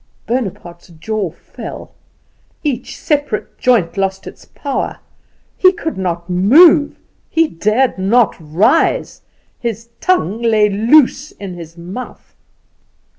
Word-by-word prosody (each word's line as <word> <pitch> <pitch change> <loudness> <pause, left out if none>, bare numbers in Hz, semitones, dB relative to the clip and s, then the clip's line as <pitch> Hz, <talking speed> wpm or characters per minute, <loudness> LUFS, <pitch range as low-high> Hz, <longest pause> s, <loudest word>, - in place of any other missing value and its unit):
Bonaparte's 190 -8 -4
jaw 190 +3 -4
fell: 165 - -10 0.7
each 280 -6 -3
separate 290 -8 -2
joint 200 -10 +2
lost 195 0 -1
its - - -11
power: 280 -2 -4 0.6
he 370 - +6
could 320 -3 -5
not 175 -2 -3
move; 290 - +5 0.3
he 330 0 +2
dared 215 - 0
not 220 +4 +3
rise; 170 - +1 0.4
his 230 -1 -4
tongue 230 - 0
lay 220 -3 +3
loose 260 +7 +3
in 195 -3 -8
his 170 -1 -11
mouth. 185 +9 -9
215 Hz, 110 wpm, -16 LUFS, 180-265 Hz, 0.7 s, he